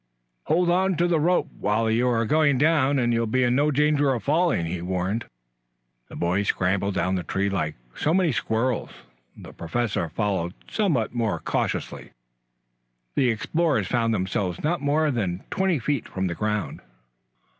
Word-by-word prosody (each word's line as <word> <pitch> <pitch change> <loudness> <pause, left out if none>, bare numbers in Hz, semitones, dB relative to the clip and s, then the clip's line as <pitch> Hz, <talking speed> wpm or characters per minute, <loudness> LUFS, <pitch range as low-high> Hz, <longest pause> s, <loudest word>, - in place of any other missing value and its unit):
"Hold 175 +1 +2
on 190 +1 +2
to 175 +2 +2
the 170 -2 +2
rope 175 +4 +2
while 110 +2 +1
you 115 +3 +2
are 115 -2 +1
going 145 +1 +3
down 145 -1 +3
and 120 -2 +1
you'll 115 0 +1
be 130 +4 +1
in 120 0 +2
no 145 +4 +3
danger 145 -1 +2
of 115 - -5
falling," 160 - +2
he 85 +1 -4
warned. 95 +5 -2 0.8
The - - -10
boys 90 +4 0
scrambled 95 +2 0
down 95 - 0
the 95 - 0
tree 100 +3 -1
like 80 -5 -2 0.2
so 155 - 0
many 180 -2 +3
squirrels, 115 +2 -1 0.5
the - - -11
Professor 90 0 -2
following 95 -1 -2
somewhat 155 - 0
more 115 -3 0
cautiously. - - -3 1.0
The 130 - +2
explorers 155 +7 0
found 115 -2 0
themselves 95 -3 -2
not 155 0 0
more 150 +2 +2
than 95 -7 -2
twenty 190 -3 +1
feet 140 0 -2
from 95 0 -3
the 90 - -1
ground. 105 +2 -2
120 Hz, 165 wpm, -24 LUFS, 100-150 Hz, 1.0 s, going